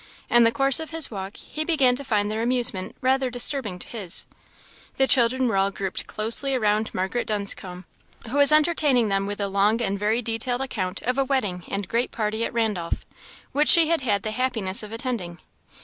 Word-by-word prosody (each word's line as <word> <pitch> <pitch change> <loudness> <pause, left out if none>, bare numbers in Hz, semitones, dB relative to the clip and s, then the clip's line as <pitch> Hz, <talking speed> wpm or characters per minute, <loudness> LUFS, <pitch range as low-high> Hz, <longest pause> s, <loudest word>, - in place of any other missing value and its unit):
In 240 -1 +5
the 230 - +3
course 270 +3 +4
of 320 - -6
his 325 -5 +1
walk, 195 0 -7
he 310 - -5
began 280 -7 +2
to 280 - -7
find 210 -5 -1
their 220 +1 -3
amusement 240 -5 +2
rather 260 0 +1
disturbing 245 -5 0
to - - -5
his. 195 -6 -3 0.7
The 270 - +2
children 255 0 +2
were 200 - -1
all 195 +1 +2
grouped 195 -1 -5
closely 235 +6 +3
around 215 -2 0
Margaret 190 +6 -3
Dunscombe, 195 -3 -2 0.4
who 270 +6 -2
was 285 0 +6
entertaining 300 -7 +2
them 195 0 -1
with 205 +1 -6
a 200 - -1
long 200 +3 +1
and 200 -4 -2
very 220 +4 -1
detailed 235 +3 -3
account 190 -9 -4
of 250 +3 -1
a - - +3
wedding 205 -11 -2
and 200 -1 -4
great 235 +4 -1
party 220 0 -3
at - - -3
Randolph, 210 -8 -3 0.5
which 295 +2 +1
she 330 -2 +9
had 335 -3 0
had 205 -6 -1
the 215 - -3
happiness 225 -4 -1
of 210 -1 -8
attending. 225 -7 -5
230 Hz, 195 wpm, -23 LUFS, 200-260 Hz, 0.7 s, she